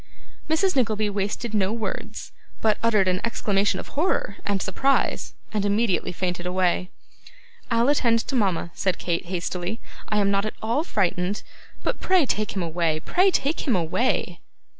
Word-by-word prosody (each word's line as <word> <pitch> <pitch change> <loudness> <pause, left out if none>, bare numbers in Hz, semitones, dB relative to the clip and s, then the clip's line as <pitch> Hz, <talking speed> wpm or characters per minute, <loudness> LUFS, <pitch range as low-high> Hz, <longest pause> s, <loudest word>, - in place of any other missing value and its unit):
Mrs. 365 +4 +2
Nickleby 215 -5 +1
wasted 205 +3 -2
no 200 -2 +2
words, 225 -1 -4 0.3
but 215 -1 +2
uttered 215 -4 +3
an 185 0 +1
exclamation 205 -3 +1
of - - -8
horror 295 - 0
and 200 -1 +1
surprise, 270 +10 0 0.2
and 210 -2 0
immediately 205 -2 +1
fainted 180 0 -2
away. 180 0 +1 0.8
'I'll 230 +1 +3
attend 240 -5 +3
to 270 - -4
mama,' 190 -7 +1
said 185 -3 0
Kate, 170 0 -1
hastily; 180 +3 -3 0.3
'I 210 - +1
am 200 -1 +3
not 200 +1 +1
at - - -6
all 230 +8 0
frightened. 190 - 0 0.4
But - - -1
pray 370 -5 +3
take 215 -4 -1
him 190 - 0
away: 165 -1 0
pray 370 - +3
take 310 -2 0
him 245 - +4
away! 180 +9 0
205 Hz, 160 wpm, -24 LUFS, 185-235 Hz, 0.8 s, him